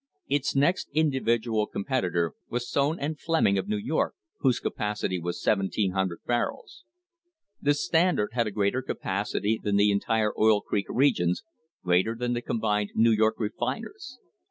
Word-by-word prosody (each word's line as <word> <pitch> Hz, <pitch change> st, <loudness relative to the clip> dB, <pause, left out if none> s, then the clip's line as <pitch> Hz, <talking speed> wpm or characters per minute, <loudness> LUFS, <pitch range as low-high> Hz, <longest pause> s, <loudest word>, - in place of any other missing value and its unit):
* 145 Hz, -, -50 dB
Its 140 Hz, 0 st, 0 dB
next 145 Hz, +7 st, +2 dB
individual 120 Hz, -7 st, +1 dB
competitor 90 Hz, -, -1 dB, 0.2 s
was 120 Hz, 0 st, -3 dB
Sone 145 Hz, +5 st, 0 dB
and 150 Hz, +2 st, -3 dB
Fleming, 160 Hz, -12 st, +2 dB
of -, -, -4 dB
New 105 Hz, -, 0 dB
York, 135 Hz, +10 st, -1 dB, 0.2 s
whose 130 Hz, -3 st, +2 dB
capacity 105 Hz, -3 st, -2 dB
was 85 Hz, +1 st, -4 dB
1,700 95 Hz, -3 st, 0 dB
barrels. 310 Hz, -, -3 dB, 0.8 s
The 145 Hz, 0 st, +3 dB
Standard 165 Hz, -, +2 dB
had 115 Hz, -2 st, +1 dB
a -, -, -3 dB
greater 100 Hz, +5 st, 0 dB
capacity 105 Hz, -1 st, -2 dB
than 105 Hz, -1 st, 0 dB
the 100 Hz, +1 st, +4 dB
entire 105 Hz, +2 st, +1 dB
Oil 110 Hz, -1 st, +5 dB
Creek 100 Hz, -1 st, -2 dB
Regions, 105 Hz, -10 st, +2 dB, 0.4 s
greater 95 Hz, +5 st, +2 dB
than 120 Hz, +1 st, -1 dB
the 120 Hz, -, -2 dB
combined 105 Hz, -3 st, -1 dB
New 115 Hz, +1 st, +5 dB
York 110 Hz, 0 st, +3 dB
refiners. 140 Hz, -, -4 dB
110 Hz, 150 wpm, -27 LUFS, 100-135 Hz, 0.8 s, Oil